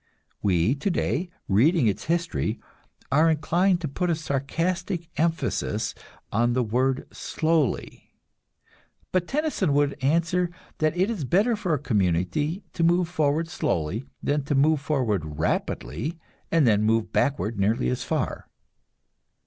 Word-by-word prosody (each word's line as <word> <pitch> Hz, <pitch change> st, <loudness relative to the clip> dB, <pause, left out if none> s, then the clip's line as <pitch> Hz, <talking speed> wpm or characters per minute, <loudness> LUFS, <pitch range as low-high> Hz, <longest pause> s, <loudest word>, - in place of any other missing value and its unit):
We 95 Hz, +3 st, +2 dB
today, 170 Hz, +2 st, -1 dB, 0.2 s
reading 135 Hz, -, +4 dB
its 105 Hz, -3 st, 0 dB
history, 165 Hz, -9 st, -1 dB, 0.5 s
are 155 Hz, +4 st, +5 dB
inclined 175 Hz, +4 st, +2 dB
to 160 Hz, -, -2 dB
put 180 Hz, +6 st, -2 dB
a 170 Hz, -, +2 dB
sarcastic 165 Hz, +4 st, -2 dB
emphasis 165 Hz, +2 st, -1 dB, 0.4 s
on 120 Hz, +3 st, +2 dB
the 125 Hz, 0 st, +2 dB
word 130 Hz, +4 st, 0 dB
"slowly"; 160 Hz, -4 st, -1 dB, 1.0 s
but 180 Hz, -1 st, +1 dB
Tennyson 285 Hz, -, 0 dB
would 145 Hz, -1 st, +1 dB
answer 170 Hz, +5 st, +2 dB, 0.3 s
that 155 Hz, +2 st, +1 dB
it 190 Hz, +5 st, +2 dB
is 200 Hz, -10 st, -3 dB
better 200 Hz, -, +2 dB
for 185 Hz, -7 st, 0 dB
a -, -, -1 dB
community 110 Hz, -, 0 dB
to 170 Hz, -, -1 dB
move 175 Hz, +1 st, +3 dB
forward 155 Hz, -1 st, +1 dB
slowly 110 Hz, -, -1 dB, 0.2 s
than 145 Hz, 0 st, +1 dB
to 145 Hz, -, 0 dB
move 150 Hz, +2 st, +3 dB
forward 105 Hz, -, -1 dB
rapidly 155 Hz, -, -2 dB, 0.3 s
and 165 Hz, -3 st, +4 dB
then 105 Hz, -3 st, +4 dB
move 110 Hz, +1 st, +1 dB
backward 115 Hz, -6 st, 0 dB
nearly 100 Hz, -, +2 dB
as 65 Hz, -, -1 dB
far. -, -, -2 dB
150 Hz, 135 wpm, -25 LUFS, 120-170 Hz, 1.0 s, are